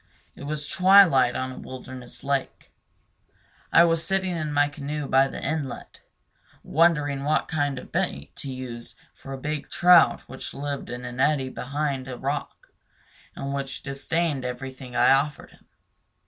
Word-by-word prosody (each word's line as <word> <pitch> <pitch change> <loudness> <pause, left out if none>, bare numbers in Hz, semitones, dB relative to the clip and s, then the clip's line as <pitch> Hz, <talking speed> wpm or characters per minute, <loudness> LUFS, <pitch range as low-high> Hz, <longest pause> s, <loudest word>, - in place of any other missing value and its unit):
It - - -10
was 150 0 -4
twilight 180 -10 +6
on 130 0 -2
a - - -9
wilderness 125 -1 -9
lake. 140 -1 -2 1.0
I 170 - +7
was 165 -1 +2
sitting 190 -2 -1
in 155 -2 -3
my 145 0 +3
canoe 145 0 -5
by 135 0 +4
the - - -7
inlet, 145 -3 -4 0.6
wondering 150 -4 +2
what 155 +2 +1
kind 145 -3 -1
of - - -9
bait 70 +1 -2
to 140 - -5
use 125 -2 -7 0.2
for 135 - -11
a 135 - -4
big 150 +2 -4
trout 175 -1 +6
which 130 - -9
lived 140 0 -4
in 125 +1 -6
an 125 +1 -7
eddy 135 -2 +2
behind 140 0 -3
a 130 -2 -6
rock, 140 0 -4 0.7
and 140 0 -4
which 140 -1 -4
disdained 145 +1 -1
everything 130 0 -6
I - - +5
offered 140 +2 +1
him. - - -23
140 Hz, 155 wpm, -25 LUFS, 130-150 Hz, 1.0 s, I